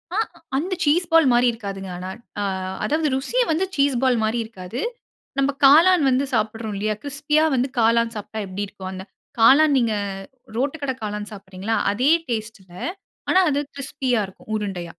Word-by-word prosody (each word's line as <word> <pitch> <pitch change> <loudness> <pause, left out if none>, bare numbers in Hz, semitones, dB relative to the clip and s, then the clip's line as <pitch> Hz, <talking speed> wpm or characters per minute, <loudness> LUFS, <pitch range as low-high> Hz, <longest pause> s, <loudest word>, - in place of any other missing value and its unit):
ஆ - - 0 0.4
அந்த 355 +7 -1
cheese 330 +4 +3
ball 325 -4 +6
மாரி 245 +1 +4
இருக்காதுங்க. 195 -4 -6
ஆனா. 185 +1 -6 0.3
ஆ - - 0 0.4
அதாவது 310 +1 +1
ருசிய 465 - 0
வந்து 335 +5 +1
சீஸ் 280 -1 +2
பால் 255 -2 +3
மாரி 220 +2 0
இருக்காது. 220 +3 -7 0.6
நம்ப 275 +1 +2
காளான் 325 +4 +7
வந்து 260 +2 +2
சாப்பிடுறோம், 220 -1 -1
இல்லையா? 215 +1 -1
கிரிஸ்பியா 295 +2 +1
வந்து 255 +2 +1
காளான் 230 0 +3
சாப்பிட்டா, 215 +1 -6
எப்பிடி 195 +2 -4
இருக்கும்? 190 -1 -8
அந்த 190 +1 -7 0.3
காளான். 285 +5 +6
நீங்க 230 -3 +2 0.6
ரோட்டு 280 +5 -1
கடை 265 -2 -1
காளான் 210 0 -4
சாப்பிடுறீங்கல்ல, 195 +2 -4 0.2
அதே 255 +8 +2 0.2
டேஸ்ட்ல 215 -5 -5 0.6
ஆனா, 375 - +5
அது 285 - +1 0.2
கிரிஸ்பியா 265 -4 -1
இருக்கும். 190 +3 -13
உருண்டையா. 190 -5 -4
235 Hz, 160 wpm, -22 LUFS, 210-285 Hz, 0.6 s, காளான்